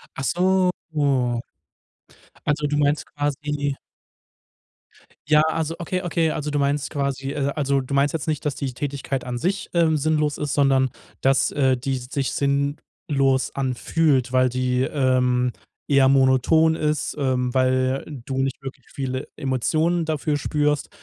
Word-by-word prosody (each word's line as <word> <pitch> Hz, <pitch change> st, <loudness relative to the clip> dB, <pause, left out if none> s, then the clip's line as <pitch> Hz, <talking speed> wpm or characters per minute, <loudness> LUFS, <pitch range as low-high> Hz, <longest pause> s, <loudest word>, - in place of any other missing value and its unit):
Ach 135 Hz, -, -5 dB
so. 185 Hz, +3 st, +2 dB, 1.8 s
Also 150 Hz, 0 st, +1 dB
du 145 Hz, 0 st, -1 dB
meinst 145 Hz, +1 st, +1 dB
quasi 145 Hz, 0 st, -2 dB, 1.5 s
Ja, 150 Hz, -1 st, +5 dB
also 160 Hz, 0 st, -1 dB
okay, 180 Hz, +2 st, -2 dB
okay. 165 Hz, -2 st, +1 dB
Also 150 Hz, 0 st, -3 dB
du 145 Hz, -, 0 dB
meinst 140 Hz, +1 st, 0 dB
quasi, 140 Hz, -1 st, -2 dB
äh 140 Hz, -1 st, -1 dB
also 140 Hz, -2 st, +1 dB
du 130 Hz, +2 st, -6 dB
meinst 140 Hz, +1 st, +2 dB
jetzt 160 Hz, -1 st, -3 dB
nicht, 155 Hz, -2 st, -1 dB
dass 145 Hz, -, 0 dB
die 135 Hz, -3 st, -4 dB
Tätigkeit 140 Hz, 0 st, -3 dB
an 125 Hz, -1 st, -4 dB
sich, 185 Hz, +10 st, -2 dB
ähm, 165 Hz, -2 st, +3 dB
sinnlos 150 Hz, 0 st, +1 dB
ist, 145 Hz, -2 st, -2 dB
sondern, 135 Hz, -2 st, +3 dB, 0.3 s
dass, 135 Hz, 0 st, +3 dB
äh, 130 Hz, -3 st, +2 dB
die 135 Hz, +2 st, -2 dB
sich 130 Hz, +2 st, -3 dB
sinnlos 140 Hz, -1 st, 0 dB
anfühlt, 130 Hz, 0 st, +1 dB
weil 130 Hz, 0 st, +4 dB
die, 125 Hz, 0 st, 0 dB
ähm, 125 Hz, -3 st, +1 dB, 0.3 s
eher 140 Hz, -2 st, +5 dB
monoton 135 Hz, +4 st, +4 dB
ist, 150 Hz, -2 st, -1 dB
ähm, 125 Hz, -2 st, 0 dB
weil 130 Hz, +1 st, +1 dB, 0.2 s
du 135 Hz, -1 st, -4 dB
nicht 135 Hz, 0 st, -2 dB
wirklich 135 Hz, -1 st, -9 dB
viele 130 Hz, -1 st, -3 dB
Emotionen 155 Hz, +5 st, 0 dB
dafür 155 Hz, -1 st, -1 dB
spürst. 150 Hz, 0 st, 0 dB
140 Hz, 145 wpm, -23 LUFS, 130-150 Hz, 1.8 s, Ja